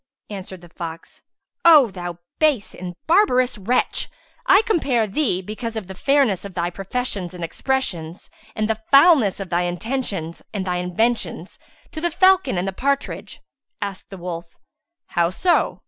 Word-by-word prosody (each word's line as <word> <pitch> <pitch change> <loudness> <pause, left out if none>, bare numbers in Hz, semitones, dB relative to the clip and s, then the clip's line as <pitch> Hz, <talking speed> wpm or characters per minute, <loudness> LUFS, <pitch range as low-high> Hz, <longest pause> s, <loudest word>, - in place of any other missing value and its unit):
Answered 190 -2 -7
the 175 - -14
fox, 165 -1 -8 0.4
"O 300 -9 +7
thou 175 -2 -6 0.2
base 295 -9 +2
and 180 -1 -7
barbarous 255 - +3
wretch, 235 +6 0 0.4
I 390 +3 +6
compare 285 - +1
thee, 205 -4 0
because 225 +3 -5
of 220 -3 -4
the 190 - -8
fairness 270 -2 +2
of 200 -3 -9
thy 175 0 -1
professions 195 -1 -4
and 175 - -6
expressions, 175 -5 -2 0.3
and 215 0 0
the 220 0 -2
foulness 275 - +6
of 195 -2 -6
thy 175 +1 +2
intentions 180 -2 -3
and 195 -2 -2
thy 180 -1 -1
inventions 200 +7 -1 0.3
to 315 - -6
the 345 - +2
Falcon 365 - +3
and 180 +2 -1
the 195 - -2
Partridge." 280 +6 -2 0.4
Asked 200 -2 -6
the 195 - -9
wolf, 170 -1 -7 0.5
"How 170 -1 +2
so?" 345 - +1
205 Hz, 155 wpm, -22 LUFS, 180-270 Hz, 0.5 s, O